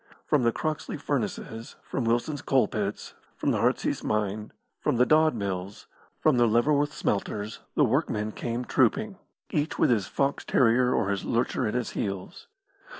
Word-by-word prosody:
From 150 -3 +2
the 115 -1 +3
Croxley 155 +5 -3
Furnaces, 115 +1 -3
from 130 - -3
Wilson's 120 +6 0
Coal 135 -2 +3
pits, 105 -3 -4 0.2
from - - 0
the - - 0
Heartsease - - 0
Mine, 105 0 -1 0.3
from - - 0
the 125 - +5
Dodd 155 -1 +4
Mills, 100 -2 -4 0.3
from 155 -5 +3
the 120 -1 +5
Leverworth 145 +6 +2
Smelters 105 -3 -2 0.2
the - - +5
workmen 105 +1 0
came 120 +3 -3
trooping, 195 - +1 0.3
each 150 0 -1
with - - +3
his 105 -5 +1
fox 140 +1 -1
terrier 125 0 +3
or 100 - +1
his 100 - -2
lurcher 120 0 0
at 105 - -2
his 125 -2 -1
heels. 100 - -5
120 Hz, 160 wpm, -27 LUFS, 105-140 Hz, 0.3 s, the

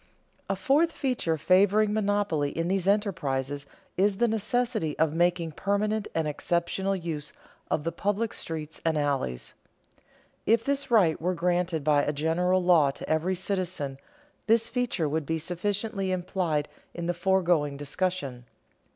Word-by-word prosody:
_A 195 - 0
fourth 290 - +3
feature 250 - -1
favoring 200 +6 +4
monopoly 205 -8 +1
in 165 +1 0
these 190 -1 0
enterprises 145 - 0 0.3
is 195 +1 +2
the 240 - +3
necessity 220 -5 -1
of 160 -1 +2
making 170 -1 +1
permanent 210 +5 -1
and 160 -1 +1
exceptional 170 +5 -1
use 160 -5 -5 0.4
of 150 - 0
the 165 - -1
public 205 +4 -1
streets 160 -1 -6
and 160 -1 +1
alleys._ 135 - -2 0.9
If 230 +1 +4
this 280 0 -1
right 185 -11 +4
were 180 +2 0
granted 175 -2 0
by 145 -1 +4
a 150 - -1
general 175 +5 +1
law 170 -5 +5
to 135 - -7
every 160 +4 +1
citizen, 180 -7 -3 0.5
this 225 +1 +4
feature 235 -9 -1
would 150 0 -2
be 160 - 0
sufficiently 195 +4 -2
implied 175 -5 -1 0.3
in 170 - -4
the 175 - 0
foregoing 175 -5 +1
discussion. 145 -4 -2
180 Hz, 140 wpm, -27 LUFS, 155-205 Hz, 0.9 s, law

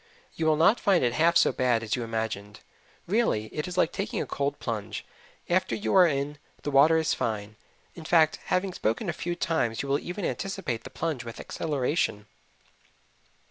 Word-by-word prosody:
You 160 - -1
will 155 - +4
not 165 +9 +4
find 190 -6 +3
it 120 -1 +2
half 170 +4 +4
so - - +4
bad 125 -3 +1
as 110 - -1
you 125 - -3
imagined; 110 -3 -4 0.4
really, 185 - 0
it 150 - -3
is 180 0 -6
like 170 - +3
taking 205 +2 -3
a - - -1
cold 140 0 -2
plunge: 110 -4 -4 0.4
after 185 +2 +1
you 210 - -2
are 185 -2 +7
in, 145 0 -2 0.2
the 145 - -2
water 150 +4 +6
is 160 -1 +1
fine. 105 -2 -3 0.4
In 165 - -10
fact, 160 -2 +4
having 185 0 0
spoken 110 0 -1
a - - -1
few 175 +1 -3
times 160 -10 0
you - - -5
will 140 +1 +2
even 180 +1 -5
anticipate 190 - -3
the - - -7
plunge 155 -7 -3
with 115 -1 -8
exhilaration. 140 -7 -1
150 Hz, 185 wpm, -27 LUFS, 115-175 Hz, 0.4 s, are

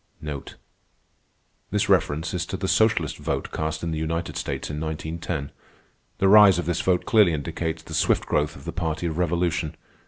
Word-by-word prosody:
This - - 0
reference 80 +6 +1
is 90 -1 -2
to 95 - -4
the 95 - -3
socialist 110 -7 +2
vote - - -3
cast 80 +1 -3
in 85 - -2
the 80 - -2
United 85 +2 -3
States - - -4
in 75 - -4
1910. 80 -1 -4 0.7
The 95 - +2
rise 100 -2 +8
of 90 - -2
this 85 0 0
vote 90 -1 +1
clearly 105 -6 +5
indicates 80 +2 -3
the 80 - -10
swift 75 - +2
growth 75 0 0
of - - -13
the - - -4
party 85 -1 -2
of 80 0 -2
revolution. 85 -2 0
85 Hz, 175 wpm, -24 LUFS, 80-90 Hz, 0.7 s, rise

